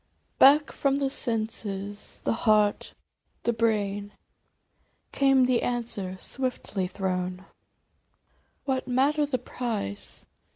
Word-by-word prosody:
" -, -, -44 dB
Back 290 Hz, +2 st, +7 dB
from 275 Hz, -1 st, +1 dB
the 275 Hz, -1 st, 0 dB
senses, 215 Hz, -5 st, -3 dB
the -, -, +1 dB
heart, 215 Hz, -2 st, +2 dB, 0.5 s
the 235 Hz, -, +1 dB
brain, 205 Hz, -3 st, 0 dB, 1.0 s
Came 270 Hz, -2 st, +4 dB
the 250 Hz, -1 st, +2 dB
answer 220 Hz, -6 st, -3 dB
swiftly 245 Hz, -5 st, -3 dB
thrown, 185 Hz, -1 st, -3 dB, 0.6 s
" -, -, -42 dB
What 265 Hz, -2 st, -1 dB
matter 285 Hz, +4 st, +2 dB
the 270 Hz, -3 st, 0 dB
price 225 Hz, -, -5 dB
230 Hz, 110 wpm, -27 LUFS, 200-260 Hz, 1.0 s, Back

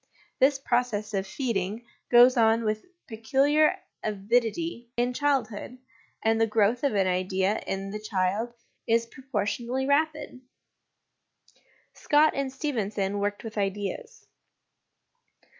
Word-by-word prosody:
This 270 Hz, +1 st, +4 dB
process 240 Hz, -5 st, -1 dB
Q{ 195 Hz, -2 st, 0 dB
feeding 225 Hz, -2 st, -3 dB, 0.2 s
goes 245 Hz, +2 st, +7 dB
on 225 Hz, -1 st, +3 dB
with 215 Hz, +6 st, -2 dB, 0.2 s
peculiar 275 Hz, +7 st, +2 dB, 0.3 s
avidity 235 Hz, -, -1 dB
in 245 Hz, +1 st, +1 dB
childhood, 250 Hz, -4 st, -1 dB, 0.5 s
and 225 Hz, 0 st, +2 dB
the 225 Hz, -, +4 dB
growth 220 Hz, +3 st, +2 dB
of 275 Hz, -6 st, +1 dB
an 195 Hz, -1 st, +3 dB
idea 185 Hz, +2 st, 0 dB
in 195 Hz, 0 st, -3 dB
the 210 Hz, -, -5 dB
child 210 Hz, +2 st, -1 dB, 0.4 s
is 230 Hz, 0 st, +2 dB
proportionally 240 Hz, +1 st, -3 dB
rapid. 300 Hz, -2 st, 0 dB, 1.5 s
Scott 300 Hz, +1 st, +3 dB
and 275 Hz, -1 st, -2 dB
Stephenson 210 Hz, -8 st, -2 dB
worked 205 Hz, 0 st, -2 dB
with 220 Hz, -2 st, -5 dB
Ideas. 200 Hz, 0 st, -4 dB
225 Hz, 110 wpm, -27 LUFS, 205-260 Hz, 1.5 s, goes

